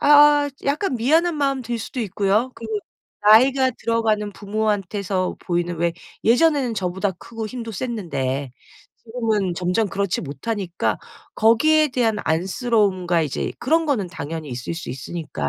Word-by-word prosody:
아 290 Hz, 0 st, +6 dB, 0.2 s
약간 290 Hz, +3 st, 0 dB
미안한 315 Hz, +8 st, +2 dB
마음 275 Hz, -2 st, 0 dB
들 240 Hz, 0 st, -3 dB
수도 240 Hz, +3 st, -6 dB
있고요. 210 Hz, +4 st, 0 dB
그리고 220 Hz, -2 st, -4 dB, 0.4 s
나이가 260 Hz, +5 st, +6 dB
들어가는 220 Hz, -3 st, 0 dB
부모한테서 200 Hz, -2 st, -2 dB
보이는 175 Hz, -1 st, -1 dB
왜 170 Hz, +1 st, +1 dB, 0.3 s
예전에는 260 Hz, 0 st, +3 dB
저보다 190 Hz, +1 st, -1 dB
크고 225 Hz, +4 st, -7 dB
힘도 230 Hz, -1 st, -6 dB
셌는데 140 Hz, -, -3 dB, 0.5 s
지금은 220 Hz, -6 st, -1 dB
점점 180 Hz, +5 st, 0 dB
그렇지 195 Hz, -1 st, -1 dB
못하니까 185 Hz, +4 st, -3 dB, 0.4 s
거기에 305 Hz, +8 st, +4 dB
대한 240 Hz, -4 st, +1 dB
안쓰러움과 185 Hz, -1 st, +1 dB
이제 145 Hz, -3 st, -2 dB
그런 320 Hz, +6 st, +2 dB
거는 240 Hz, -10 st, 0 dB
당연히 160 Hz, -1 st, -6 dB
있을 125 Hz, +7 st, -4 dB
수 165 Hz, -, -7 dB
있으니까. 130 Hz, -, -4 dB
215 Hz, 330 characters per minute, -22 LUFS, 180-250 Hz, 0.5 s, 아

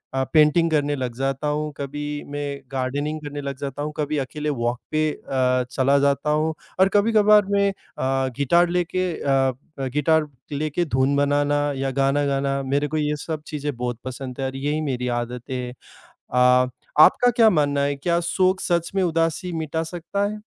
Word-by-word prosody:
अ, 135 Hz, -, +1 dB
painting 155 Hz, +2 st, +5 dB
करने 145 Hz, -1 st, +1 dB
लग 125 Hz, -3 st, -4 dB
जाता 135 Hz, +2 st, -1 dB
हूँ, 150 Hz, +1 st, -1 dB
कभी 145 Hz, +1 st, -4 dB
मैं 145 Hz, -1 st, -4 dB
गार्डनिंग 140 Hz, +4 st, -2 dB
करने 145 Hz, -1 st, -6 dB
लग 140 Hz, -1 st, -5 dB
जाता 140 Hz, 0 st, -5 dB
हूँ। 150 Hz, +1 st, -3 dB
कभी 150 Hz, 0 st, -1 dB
अकेले 150 Hz, +2 st, -3 dB
वॉक 120 Hz, -2 st, -1 dB
पे 155 Hz, 0 st, +1 dB
अ, 130 Hz, -3 st, 0 dB
चला 135 Hz, +2 st, +3 dB
जाता 140 Hz, +1 st, +1 dB
हूँ 155 Hz, +1 st, +1 dB, 0.3 s
और 190 Hz, +1 st, +5 dB
कभी-कभार 210 Hz, 0 st, +5 dB
मैं 200 Hz, 0 st, +3 dB
अ, 135 Hz, -7 st, -2 dB
गिटार 170 Hz, +5 st, +3 dB
लेके 180 Hz, +1 st, 0 dB
अ 140 Hz, -, -2 dB, 0.5 s
अ, 135 Hz, -, -1 dB
गिटार 155 Hz, +1 st, +2 dB, 0.2 s
लेके 150 Hz, +3 st, -1 dB
धुन 135 Hz, -1 st, +1 dB
बनाना 145 Hz, +1 st, +2 dB, 0.2 s
या 135 Hz, 0 st, -1 dB
गाना 135 Hz, +2 st, +1 dB
गाना, 140 Hz, 0 st, 0 dB
मेरे 140 Hz, +2 st, 0 dB
को 155 Hz, -, -3 dB
ये 150 Hz, 0 st, 0 dB
सब 155 Hz, 0 st, -5 dB
चीज़ें 145 Hz, -2 st, -4 dB
बहुत 120 Hz, -1 st, -3 dB
पसंद 130 Hz, 0 st, -7 dB
हैं 135 Hz, -, -1 dB
और 130 Hz, -, -6 dB
यही 145 Hz, +3 st, -1 dB
मेरी 125 Hz, -4 st, -2 dB
आदतें 120 Hz, +2 st, -4 dB
हैं। 125 Hz, -1 st, -4 dB, 0.6 s
अ, -, -, -3 dB, 0.7 s
आपका 245 Hz, +9 st, +6 dB
क्या 225 Hz, -3 st, +7 dB
मानना 145 Hz, -5 st, +1 dB
है, 140 Hz, 0 st, 0 dB
क्या 170 Hz, +4 st, 0 dB
शौक 185 Hz, +2 st, +1 dB
सच 170 Hz, -1 st, 0 dB
में 195 Hz, -, +2 dB
उदासी 165 Hz, +1 st, 0 dB
मिटा 160 Hz, -1 st, -2 dB
सकता 175 Hz, +4 st, -3 dB
है? 210 Hz, +1 st, -5 dB
145 Hz, 180 wpm, -23 LUFS, 135-160 Hz, 0.7 s, क्या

